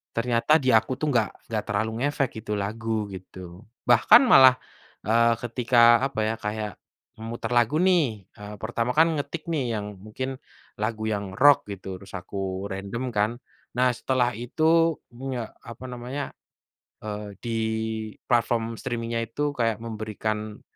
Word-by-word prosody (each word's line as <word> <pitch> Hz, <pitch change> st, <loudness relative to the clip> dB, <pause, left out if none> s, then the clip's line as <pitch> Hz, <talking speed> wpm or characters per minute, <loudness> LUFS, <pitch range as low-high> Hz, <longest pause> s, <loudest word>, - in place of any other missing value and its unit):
Ternyata 120 Hz, +5 st, +2 dB
di 130 Hz, -, +3 dB
aku 115 Hz, +3 st, +3 dB
tuh 150 Hz, +2 st, -1 dB
nggak 115 Hz, -1 st, -1 dB
nggak 110 Hz, -2 st, -1 dB
terlalu 105 Hz, +2 st, -1 dB
ngefek 135 Hz, -4 st, -1 dB
gitu 105 Hz, 0 st, -3 dB
lagu, 110 Hz, +2 st, -2 dB
gitu. 95 Hz, 0 st, -10 dB, 0.2 s
Bahkan 120 Hz, -, +7 dB
malah, 130 Hz, -, +8 dB, 0.5 s
eee, 115 Hz, +2 st, +3 dB
ketika, 120 Hz, 0 st, +5 dB
apa 135 Hz, -5 st, -6 dB
ya, 110 Hz, +1 st, 0 dB
kayak 105 Hz, -2 st, -4 dB, 0.4 s
memutar 115 Hz, +1 st, -5 dB
lagu 120 Hz, +3 st, +3 dB
nih, 150 Hz, -, +2 dB, 0.2 s
eee, 105 Hz, +1 st, -8 dB
pertama 115 Hz, +4 st, -2 dB
kan 165 Hz, +2 st, +5 dB
ngetik 155 Hz, +2 st, -5 dB
nih 130 Hz, -8 st, -1 dB
yang 105 Hz, -2 st, -6 dB
mungkin 130 Hz, +6 st, -5 dB, 0.4 s
lagu 110 Hz, 0 st, -2 dB
yang 100 Hz, -2 st, -3 dB
rock 140 Hz, +1 st, +5 dB
gitu, 95 Hz, -2 st, -7 dB
terus 100 Hz, 0 st, -11 dB
aku 95 Hz, 0 st, -4 dB
random 110 Hz, +6 st, -4 dB
kan. 105 Hz, +1 st, +1 dB, 0.4 s
Nah, 125 Hz, +1 st, +3 dB
setelah 125 Hz, +1 st, 0 dB
itu, 160 Hz, +8 st, +2 dB, 0.2 s
mmm, 130 Hz, +2 st, -5 dB
ya, 120 Hz, -, -2 dB, 0.2 s
apa 115 Hz, +2 st, -11 dB
namanya, 125 Hz, +3 st, -5 dB, 0.7 s
eee, 105 Hz, -1 st, -6 dB
di 115 Hz, -2 st, -2 dB, 0.7 s
platform 115 Hz, -1 st, +1 dB
streaming-nya 115 Hz, -1 st, -3 dB
itu 145 Hz, +6 st, -2 dB
kayak 115 Hz, -5 st, -1 dB
memberikan 110 Hz, -1 st, -4 dB
115 Hz, 145 wpm, -25 LUFS, 105-125 Hz, 0.7 s, malah